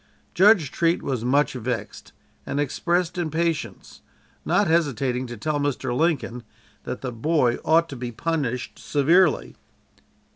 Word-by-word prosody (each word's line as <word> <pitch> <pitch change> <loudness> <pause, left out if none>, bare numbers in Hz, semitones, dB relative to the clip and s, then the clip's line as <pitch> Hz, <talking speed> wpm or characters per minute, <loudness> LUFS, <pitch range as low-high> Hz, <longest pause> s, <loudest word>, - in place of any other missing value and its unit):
Judge 190 -6 +5
Treat 170 0 +1
was 130 -5 -2
much 140 +4 +2
vexed, 120 -3 -5 0.3
and 140 - -3
expressed 175 +5 -1
impatience, 165 -1 -3 0.4
not - - +2
hesitating 135 -6 0
to 120 -1 -8
tell 145 +7 -1
Mr. 140 -4 -2
Lincoln 145 -6 0 0.4
that - - -5
the 130 - -4
boy 125 0 +1
ought 165 +1 +3
to 140 - -7
be 120 -1 -5
punished 135 -2 -3
severely. 160 +4 +2
145 Hz, 125 wpm, -24 LUFS, 125-165 Hz, 0.4 s, Judge